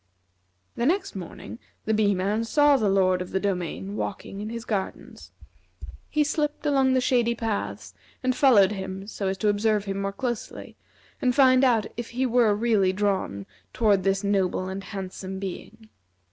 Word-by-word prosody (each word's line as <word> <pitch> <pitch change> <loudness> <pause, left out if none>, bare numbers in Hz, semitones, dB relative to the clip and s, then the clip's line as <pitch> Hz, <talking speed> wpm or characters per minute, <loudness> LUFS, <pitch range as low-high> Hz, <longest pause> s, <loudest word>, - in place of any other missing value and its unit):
The 235 - -1
next 385 - 0
morning, 190 +4 -8 0.3
the 220 - +1
Bee 210 -2 +2
man 200 +5 0
saw 290 +5 +4
the 220 -6 +1
Lord 185 -1 +2
of 180 - -5
the 190 - -1
Domain 190 0 -3
walking 200 -1 -5
in 215 - -5
his 230 0 -6
gardens. 200 -5 -5 0.8
He 305 -1 +2
slipped 295 0 -2
along 270 -3 +3
the - - +4
shady 240 -2 +2
paths, 225 -3 -4 0.3
and 255 -1 +1
followed 215 -9 +5
him 190 -1 -5
so 200 -1 -4
as 190 0 -1
to 210 - -1
observe 210 0 +1
him 195 0 -2
closely, 240 -1 -5 0.5
and 250 -1 +2
find 260 -2 +5
out 235 -5 +3
if 240 -1 -5
he 255 +2 -1
were 235 -4 +3
really 210 -4 +2
drawn 190 - -1 0.3
toward 205 -4 +2
this 195 +1 +1
noble 190 -2 0
and 190 +1 -6
handsome 190 -1 -6
being. 200 +3 -7
210 Hz, 165 wpm, -25 LUFS, 195-240 Hz, 0.8 s, followed